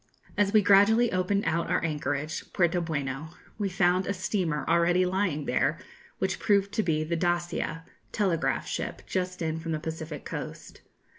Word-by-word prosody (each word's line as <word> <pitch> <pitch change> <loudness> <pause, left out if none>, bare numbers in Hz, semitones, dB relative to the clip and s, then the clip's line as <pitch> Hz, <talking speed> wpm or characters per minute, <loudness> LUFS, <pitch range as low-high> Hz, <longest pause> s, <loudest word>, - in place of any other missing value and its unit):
] - - -38
As 205 -1 +2
we 215 -1 +5
gradually 215 +4 +5
opened 185 +3 +1
out 170 +1 0
our 180 - +1
anchorage 150 0 -3
Puerto 175 0 +2
Bueno 150 -1 -4 0.2
we 200 -2 0
found 180 0 +2
a 200 - -1
steamer 180 -6 -1
already 170 +2 +3
lying 180 -6 0
there, - - +1 0.4
which - - -1
proved 200 -1 +2
to 220 - +1
be 155 -5 0
the 165 +2 -2
'Dacia,' 175 -1 -1 0.3
telegraph 185 -6 0
ship, - - -4
just 185 -1 -2
in 160 0 -1
from 165 0 -3
the 155 - -1
Pacific 160 -2 -6
coast. - - -7
175 Hz, 165 wpm, -28 LUFS, 160-195 Hz, 0.4 s, we